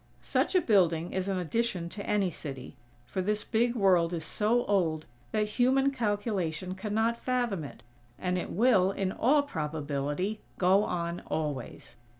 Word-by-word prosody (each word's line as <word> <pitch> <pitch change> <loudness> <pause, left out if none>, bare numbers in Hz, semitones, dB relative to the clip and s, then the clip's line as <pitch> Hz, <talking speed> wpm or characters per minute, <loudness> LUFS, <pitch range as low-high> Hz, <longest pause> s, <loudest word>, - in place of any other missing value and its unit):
Such - - 0
a 365 - +6
building 175 - +2
is 190 0 -1
an 195 -1 0
addition 185 0 -1
to 200 +3 -7
any 200 -3 +1
city; 135 -4 -7 0.3
for 185 +10 -3
this 210 +2 0
big 235 +2 +1
World 180 -5 +3
is 165 -2 -3
so 225 +7 +1
old 165 -6 +1 0.3
that 210 0 +1
human 270 +2 +4
calculation 205 - -2
cannot 220 +4 -1
fathom 245 -9 0
it; 135 -4 -10 0.3
and 180 0 -1
it 180 - -3
will, 210 -4 +4
in 195 -1 -2
all 285 +8 +3
probability, 150 - -3 0.2
go 190 +3 +4
on 170 -1 -2
always. 140 -5 -4
190 Hz, 155 wpm, -29 LUFS, 165-220 Hz, 0.3 s, a